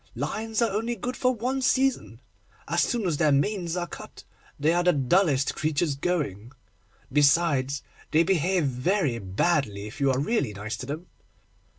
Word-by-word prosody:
lions 225 +1 -2
are 230 - +1
only 225 +4 -1
good 245 +4 -4
for 255 - +2
one 255 +4 -2
season. 265 +1 +1 0.5
As - - +1
soon 235 -5 0
as 165 -5 0
their 155 -2 +3
manes 175 +4 0
are 175 - -1
cut, - - -11 0.4
they 155 +3 +3
are 175 0 +2
the 180 0 +4
dullest 140 0 +2
creatures 155 0 0
going. 135 - -2 0.6
Besides, 140 -2 +3 0.3
they 160 +2 +4
behave 180 0 +1
very 135 - 0
badly, 105 - 0
if 105 +7 -9
you 140 - +3
are 130 - +1
really 145 - 0
nice 105 +2 -5
to 130 - -7
them. 155 +5 -5
160 Hz, 165 wpm, -26 LUFS, 135-195 Hz, 0.6 s, the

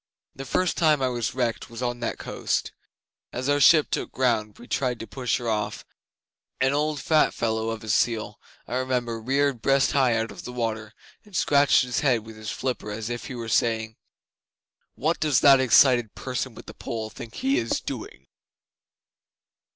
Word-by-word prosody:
'The 135 - -7
first 180 +6 0
time 155 -3 +4
I 130 -1 +1
was 120 -2 -3
wrecked 120 -3 -2
was 115 +2 -7
on 120 -1 -2
that 120 - -3
coast. - - -2 0.6
As 130 +2 -4
our 145 0 +2
ship 155 +2 +6
took - - -2
ground 120 -5 +1
and 105 - -23
we 120 - -13
tried 125 -4 -1
to - - -6
push 125 0 -2
her 120 -2 -6
off, 105 -1 -2 0.7
an 130 +1 +2
old 150 0 0
fat 155 +3 +2
fellow 110 -1 -1
of 115 -1 -5
a - - -9
seal, 110 -1 0 0.3
I 125 - -2
remember, 125 -3 -2
reared 135 0 0
breast 135 +1 +3
high 130 -4 +3
out 115 0 -1
of - - -10
the 125 - -7
water, 110 -2 -3 0.3
and 210 -3 -15
scratched 145 -4 +4
his 125 -1 -2
head 120 -6 +1
with 110 0 -11
his 110 0 -7
flipper 125 -5 -3
as 110 +2 -4
if 120 - -5
he 130 - -6
were 115 -1 -6
saying: 110 -1 0 1.0
"What 160 +5 0
does 150 -5 +2
that 135 -1 +7
excited 125 -3 +4
person 130 -2 -4
with - - -11
the - - -10
pole 110 -1 -5
think 115 -2 -10
he 270 +1 +1
is 115 - -1
doing." 65 - -7
120 Hz, 190 wpm, -25 LUFS, 115-135 Hz, 1.0 s, that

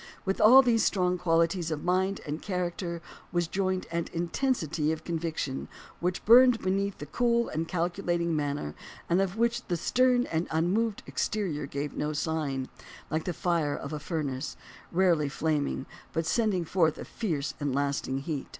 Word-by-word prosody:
With 195 0 0
all 255 +5 +9
these 230 -3 +3
strong 180 -2 +1
qualities 170 0 +2
of 155 -2 -3
mind 190 +2 +1
and 150 +1 -4
character 175 -2 -3 0.3
was 175 -1 +1
joined 185 0 -1
an 170 0 -1
intensity 170 - 0
of 160 - -4
conviction 160 -5 -3 0.3
which 180 +1 -2
burned 245 +2 +8
beneath 195 +1 -1
the 145 - -7
cool 235 - +1
and 160 +1 -2
calculating 175 -1 -1
manner 145 - -2 0.3
and 175 +3 +3
of 195 +1 -1
which 235 +1 +1
the 175 - 0
stern 250 +7 +3
and 165 +1 -1
unmoved 200 +7 0
exterior 165 -9 -2
gave 140 +1 -4
no 150 +1 -1
sign, 145 -4 -2 0.4
like 155 0 -1
the 180 - 0
fire 165 -4 0
of 140 - -6
a 150 - -3
furnace, 145 -3 -3 0.3
rarely 170 -5 +3
flaming, 145 -2 -1 0.3
but 165 0 0
sending 195 -2 +1
forth 160 -2 +2
a - - -7
fierce 155 -11 -2
and 145 -2 -1
lasting 140 -1 -1
heat. 140 -1 -4
170 Hz, 160 wpm, -29 LUFS, 155-190 Hz, 0.4 s, all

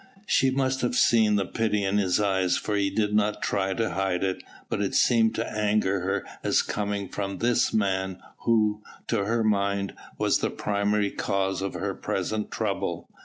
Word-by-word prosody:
She 135 - +3
must 130 0 0
have 120 0 0
seen 110 -4 +4
the 100 -1 +1
pity 105 0 0
in 100 +1 +1
his 95 -2 +2
eyes 95 -3 +2
for 105 - -2
he 100 -1 +1
did 105 +1 0
not 105 0 +1
try 95 -1 0
to 115 -1 -1
hide 95 -1 -1
it, 95 -1 -1 0.3
but - - -2
it 100 - -1
seemed 115 -2 +4
to 115 - -2
anger 105 -2 +1
her 95 +2 -2 0.2
as - - +3
coming 100 -1 -2
from 100 +1 -4
this 120 0 +2
man 95 -3 0 0.2
who 110 -2 +2 0.2
to 100 - 0
her 115 +2 +1
mind 100 -2 0 0.2
was - - +2
the - - 0
primary 100 0 0
cause 95 -1 -1
of 100 - -3
her - - -2
present 110 -1 -3
trouble. - - -3
105 Hz, 180 wpm, -26 LUFS, 95-110 Hz, 0.3 s, seen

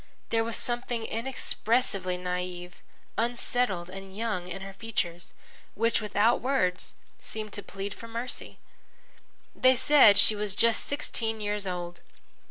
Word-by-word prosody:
There 225 0 +2
was 230 0 -3
something 240 -1 -2
inexpressibly 225 -5 0
naïve, 180 0 -4 0.5
unsettled 235 -5 0
and 195 0 -9
young 210 -6 -2
in 185 +2 -6
her 195 0 -7
features, 190 -5 -3 0.4
which, 230 +1 +2
without 215 +2 +2
words, 245 -9 0 0.3
seemed 215 -1 -7
to 205 - -4
plead 195 +1 -6
for 230 - -10
mercy. 235 +2 -5 1.0
They 255 0 +5
said 260 -5 +7
she 215 - +6
was 205 -2 -1
just 230 +1 +3
sixteen 225 -6 -2
years 205 -1 -2
old. 175 -1 -4
210 Hz, 130 wpm, -28 LUFS, 185-230 Hz, 1.0 s, said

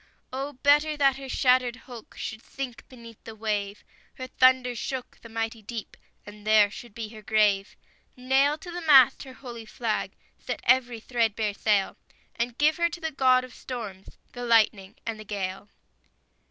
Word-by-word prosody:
Oh, 275 +2 -4
better 295 +1 +4
that 275 -2 +3
her 270 -1 -8
shattered 250 -1 +3
hulk 245 -3 -12
Should 220 0 -5
sink 265 -3 -7
beneath 230 -3 -14
the 225 - -9
wave; 210 -2 -3 0.3
Her 255 - -6
thunders 255 -2 +3
shook 260 -2 -5
the 230 - -12
mighty 225 0 -3
deep, 220 +1 -7 0.3
And 205 0 -12
there 215 -1 +5
should 235 -1 -11
be 225 -2 -5
her 215 -1 -11
grave; 210 -2 +2 0.4
Nail 270 +4 +2
to 350 +3 -10
the 350 +1 -5
mast 270 -5 +6
her 260 - -10
holy 240 -4 -10
flag, 220 -1 -2 0.3
Set - - -5
every 245 -2 +3
threadbare 225 -3 0
sail, 200 -1 +1 0.4
And 235 0 -3
give 305 +1 +3
her 340 0 +2
to 345 - -8
the 320 -1 -3
God 255 -2 +4
of 255 - -11
storms, 210 -7 -8 0.2
The 245 - -6
lightning 215 -4 +2
and 225 -1 -4
the - - -8
gale! 195 -1 -5
235 Hz, 170 wpm, -26 LUFS, 215-260 Hz, 0.4 s, mast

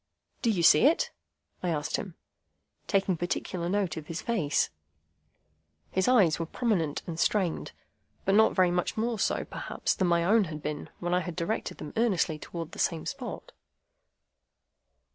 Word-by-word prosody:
"Do 235 - +2
you 185 -6 +1
see 160 - +7
it?" 320 - +2 0.5
I 180 - -1
asked 150 -2 -1
him, 185 -5 -6 0.7
taking 195 -3 +1
particular 175 0 -2
note 190 -4 0
of 155 -2 -7
his 165 - -4
face. 185 -12 0 1.2
His 190 0 +1
eyes 200 -12 +4
were 165 - -2
prominent 175 - 0
and 165 -2 -5
strained, 185 -5 +1 0.5
but 195 - +3
not 220 +2 +5
very 185 -2 +4
much 180 +3 -1
more 225 0 0
so, - - 0
perhaps, - - -2
than 185 - 0
my 170 -1 +3
own 210 +4 +4
had 155 -2 -7
been 150 0 -4
when 175 0 -2
I 180 - +4
had 175 -1 -5
directed 185 +6 -2
them 150 - -8
earnestly 185 -9 +1
towards 165 0 -6
the - - -10
same 165 -3 0
spot. 275 - -6
180 Hz, 160 wpm, -29 LUFS, 165-210 Hz, 1.2 s, see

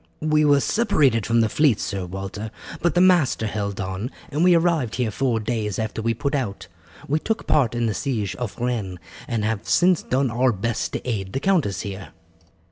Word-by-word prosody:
"We 155 0 +3
were 145 -1 +5
separated 140 - +2
from 115 0 +3
the 110 - +3
fleet, 140 -3 +3
Sir 95 -3 -3
Walter, 95 +4 -6 0.3
but 170 -2 +1
the 175 - +4
master 175 -11 +4
held 100 -2 -3
on, 95 +5 -3 0.2
and 150 +4 +1
we 180 -1 +6
arrived 165 -9 +1
here 120 -3 0
four 120 0 0
days 110 -3 -2
after 110 0 -3
we 115 +1 0
put 140 +5 -2
out. 115 -10 -3 0.4
We 150 +3 +1
took 225 +7 -2
part 125 -6 +2
in 120 0 0
the 110 - 0
siege 105 -10 -2
of 120 -5 -5
Rennes, 115 -7 -2 0.3
and 115 -3 -1
have 110 -2 -2
since 180 -1 +4
done 130 -1 0
our 125 +2 +2
best 110 +3 -2
to - - -4
aid 100 -6 -3
the 135 - 0
countess 155 - +1
here." 95 -5 -7
115 Hz, 200 wpm, -23 LUFS, 105-145 Hz, 0.4 s, we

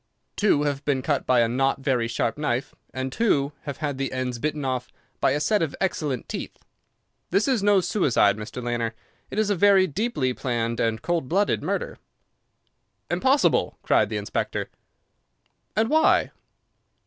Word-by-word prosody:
"Two 200 -8 +3
have 145 -1 -2
been 135 -3 0
cut 145 -1 -1
by 125 -2 +4
a 115 - +3
not 135 +3 0
very 125 -4 +1
sharp 115 0 -1
knife, 140 -3 -2 0.2
and 130 0 -4
two 145 - +1
have 140 - -5
had 145 -4 -3
the 135 - -2
ends 130 -2 -3
bitten 150 +1 -2
off 130 -1 -2 0.3
by - - +3
a 140 +3 +1
set 205 +7 +2
of 160 -4 -1
excellent 150 -9 -2
teeth. - - -6 0.7
This 195 +6 +2
is 255 -6 +2
no 200 -1 +4
suicide, 145 - +2
Mr. 110 +3 -7
Lanner. 120 -2 -2 0.3
It - - -7
is 215 -1 +2
a - - +2
very 195 +1 +5
deeply 175 - -1
planned 120 -3 -2
and 115 0 0
cold 170 -6 -1
blooded 200 +3 +1
murder." - - -3 1.1
"Impossible!" 270 +2 +2
cried - - +3
the - - -2
inspector. - - -3 1.0
"And 220 +1 +2
why?" 315 +5 +3
140 Hz, 160 wpm, -25 LUFS, 125-195 Hz, 1.1 s, very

